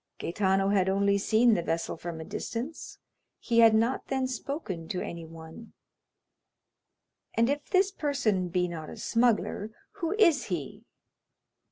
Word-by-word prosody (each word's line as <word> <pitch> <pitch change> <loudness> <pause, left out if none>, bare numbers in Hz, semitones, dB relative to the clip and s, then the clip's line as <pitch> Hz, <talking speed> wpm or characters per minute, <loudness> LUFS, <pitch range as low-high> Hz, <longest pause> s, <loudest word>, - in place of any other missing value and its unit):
"Gaetano 195 +2 +1
had 190 -2 +2
only 200 +1 +2
seen 225 +3 +4
the 175 - +1
vessel 165 0 -2
from 165 0 -6
a 160 - -7
distance, 245 - -5 0.4
he 230 -1 +1
had 225 -1 +7
not 230 +4 +1
then 265 -1 0
spoken 245 - -5
to 180 - -3
anyone." 165 +5 -8 1.6
"And 230 +3 +3
if 290 0 -4
this 385 +1 +3
person 255 - 0
be 180 0 +1
not 160 -3 -7
a - - -9
smuggler, 230 -3 +1 0.3
who 350 0 -1
is 340 -9 +4
he?" 170 -8 -5
210 Hz, 140 wpm, -28 LUFS, 175-260 Hz, 1.6 s, had